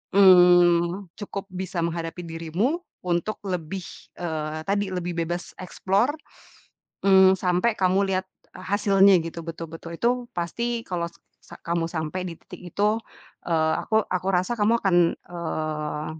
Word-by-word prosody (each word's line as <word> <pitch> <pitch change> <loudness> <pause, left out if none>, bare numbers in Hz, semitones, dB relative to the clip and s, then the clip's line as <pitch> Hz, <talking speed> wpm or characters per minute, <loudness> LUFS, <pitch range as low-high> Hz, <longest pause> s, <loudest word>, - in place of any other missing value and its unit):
mmm, 180 -1 +6
cukup 200 -1 -5
bisa 185 -1 -4
menghadapi 165 0 -3
dirimu 170 - -2 0.2
untuk 175 +4 -1
lebih, 180 +1 -3 0.4
eee, 155 -2 -3
tadi, 200 0 0
lebih 180 -1 -3
bebas 175 +2 -5
explore, 195 +8 0 0.9
mmm, 190 -1 +7
sampai 185 +5 +1
kamu 190 +1 +2
lihat 185 0 0 0.3
a 185 - -10
hasilnya 200 -1 +5
gitu 165 0 -6
betul-betul 165 0 -7
itu 235 - +3 0.2
pasti 235 +7 -2
kalau 175 -2 -2
s 170 - -23 0.3
sa - - -11
kamu 170 -1 -1
sampai 165 +2 -3
di 170 - -5
titik - - -12 0.2
itu, 210 +2 +2 0.5
eee, 160 -2 +2
aku, 220 0 +2
aku 185 0 -2
rasa 180 +6 +1
kamu 215 +2 +3
akan, 190 -4 +3 0.3
eee, 155 -3 -3
180 Hz, 135 wpm, -25 LUFS, 165-195 Hz, 0.9 s, mmm